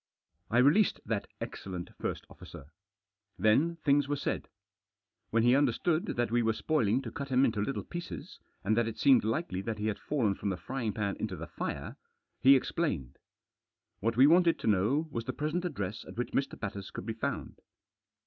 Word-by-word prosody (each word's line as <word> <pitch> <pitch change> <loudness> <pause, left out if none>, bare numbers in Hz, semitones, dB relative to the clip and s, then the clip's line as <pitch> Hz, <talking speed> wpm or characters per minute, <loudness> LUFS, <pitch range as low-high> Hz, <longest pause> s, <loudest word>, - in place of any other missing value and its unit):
I 120 - +1
released 145 - +4
that 110 -3 -2
excellent 90 -2 -6
first - - -3
officer. 70 +3 -12 0.7
Then 145 +11 +3
things 145 -1 +3
were 145 - 0
said. - - -3 0.8
When 115 0 +2
he 120 +2 +5
understood 155 +3 +2
that 120 -2 0
we 120 0 +3
were 115 -1 +2
spoiling 125 -1 +1
to 115 - -6
cut 140 +3 -5
him 130 0 +3
up - - +6
into 110 -3 0
little 135 +7 -2
pieces, 135 - -7 0.2
and 110 +3 +2
that 115 0 +2
it 115 - -5
seemed 135 -3 +5
likely 110 - -1
that 110 +2 -3
he 105 - -3
had 110 -2 -1
fallen 120 -9 0
from 100 - -3
the 95 - -2
frying 120 +4 -3
pan 100 -1 -2
into 105 -4 -3
the 85 -1 -6
fire, - - -5 0.4
he 135 +1 +7
explained. 115 - -1 0.8
What 115 +2 -1
we 130 - +8
wanted 170 +2 +5
to - - -3
know 110 - +2
was 115 -3 -3
the - - -3
present 155 +5 -2
address 105 - -3
at - - -11
which 120 - -2
Mr. 135 - -1
Batters 100 -2 -5
could - - -7
be 110 - -2
found. 110 - -4
115 Hz, 190 wpm, -31 LUFS, 105-140 Hz, 0.8 s, we